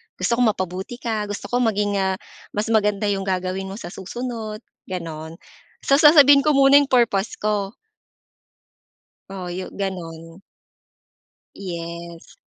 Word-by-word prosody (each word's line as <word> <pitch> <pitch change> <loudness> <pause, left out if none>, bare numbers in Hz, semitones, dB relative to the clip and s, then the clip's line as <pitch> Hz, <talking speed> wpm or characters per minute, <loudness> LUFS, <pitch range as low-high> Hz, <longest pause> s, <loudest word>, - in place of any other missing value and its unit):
gusto 235 0 0
kong 245 -3 +4
mapabuti 185 +5 -5
ka, 220 -3 -2
gusto 205 0 -6
ko 245 - +2
maging, 205 -3 +1
ah, 190 0 +1 0.4
mas 210 +2 -1
maganda 210 -1 +2
'yong 195 -1 -3
gagawin 185 +1 -2
mo 195 - -7
sa 205 - -8
susunod," 220 +2 -6 0.2
gano'n. 165 -3 -6 0.5
So, 275 +1 +4
sasabihin 290 -2 +7
ko 300 -1 +3
muna 275 +1 +7
'yong 285 - 0
purpose 230 -5 +1
ko. 205 -1 -2 1.6
Oo, 185 -2 -6
yo 185 +1 -5
gano'n. 165 -3 -6 1.1
Yes. 170 -2 -8
200 Hz, 130 wpm, -22 LUFS, 185-235 Hz, 1.6 s, sasabihin